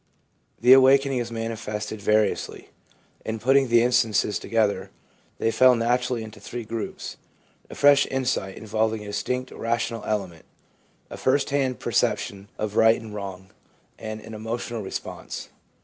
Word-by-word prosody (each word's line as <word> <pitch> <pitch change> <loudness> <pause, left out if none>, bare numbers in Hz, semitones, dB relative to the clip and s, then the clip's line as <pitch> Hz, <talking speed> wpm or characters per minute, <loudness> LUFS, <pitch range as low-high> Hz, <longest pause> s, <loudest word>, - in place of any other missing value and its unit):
The 125 +2 +7
awakening 135 0 +5
is 120 -1 -4
manifested 110 -2 -4
variously. 105 0 0 0.5
In 110 0 -3
putting 135 +4 +3
the 120 0 +4
instances 115 -4 +2
together, 110 -3 0 0.5
they 115 - +1
fell 130 +1 +6
naturally 120 0 0
into 110 0 -11
three 120 0 -6
groups 115 0 -5 0.2
— - - -35
a - - -9
fresh 145 0 +5
insight 125 -7 -2
involving 110 0 -1
a 105 - -8
distinct 125 +5 -3
rational 115 0 -2
element; 95 -6 -3 0.7
a - - -6
first 135 +2 +1
hand 135 -3 0
perception 100 0 -1
of 105 -1 -3
right 110 0 +5
and 110 -2 -10
wrong; 95 -2 -7 0.5
and 110 0 -6
an 110 - -10
emotional 115 +1 -4
response. 95 - -6
115 Hz, 140 wpm, -25 LUFS, 105-125 Hz, 0.7 s, The